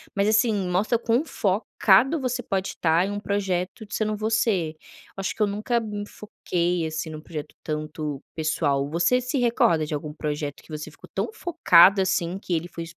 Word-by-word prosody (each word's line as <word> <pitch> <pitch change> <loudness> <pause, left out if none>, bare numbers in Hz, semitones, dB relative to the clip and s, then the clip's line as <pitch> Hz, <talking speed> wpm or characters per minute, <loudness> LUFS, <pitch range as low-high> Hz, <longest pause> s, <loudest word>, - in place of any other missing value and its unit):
mas 200 +1 +2
assim, 220 +1 +3 0.2
mostra 210 +6 +2
quão 240 +5 +1
focado 215 - +2
você 250 -1 -2
pode 190 -1 -1
estar 165 +2 +2
em - - -3
um 205 - -3
projeto 195 +1 -2
de 210 - -5
sendo 215 -1 0
você. 215 -7 +1
Eu - - -20
acho 195 - -2
que - - -7
eu 210 - +4
nunca 215 +4 0
me 210 -2 -5
foquei 175 -5 -2
assim 160 0 -4
num 155 0 -7
projeto 155 -2 -7
tanto 150 -2 -4
pessoal. 150 -3 0
Você 175 +11 +2
se 250 +3 -2
recorda 175 -10 +3
de 150 - -5
algum 150 0 -4
projeto 150 -2 -4
que - - -23
você 155 0 -8
ficou - - -16
tão - - -1
focado 200 - +5
assim 185 -1 0
que 185 -3 -4
ele 170 +1 -1
foi 170 -1 -7
190 Hz, 190 wpm, -25 LUFS, 160-215 Hz, 0.2 s, focado